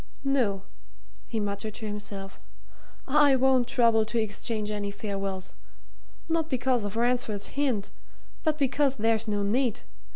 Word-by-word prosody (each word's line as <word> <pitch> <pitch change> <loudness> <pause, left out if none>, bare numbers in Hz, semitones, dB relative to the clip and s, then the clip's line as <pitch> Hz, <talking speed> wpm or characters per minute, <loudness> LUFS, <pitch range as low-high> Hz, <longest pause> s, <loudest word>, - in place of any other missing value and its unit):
"No," 240 -9 +1 0.6
he 225 - -2
muttered 205 +1 -3
to 220 - -7
himself. 205 -2 -6 0.7
"I 285 0 +5
won't 260 -2 +3
trouble 230 -3 +4
to 230 +2 -3
exchange 215 0 -2
any 205 -1 -2
farewells 195 -2 -4 0.7
not 325 -1 0
because 255 -2 +1
of 205 +1 -4
Ransford's 235 -3 0
hint, 255 -8 -1 0.5
but 310 -2 +1
because 280 -1 +2
there's 225 0 +1
no 205 -1 0
need. 235 +3 +1
225 Hz, 130 wpm, -28 LUFS, 205-260 Hz, 0.7 s, I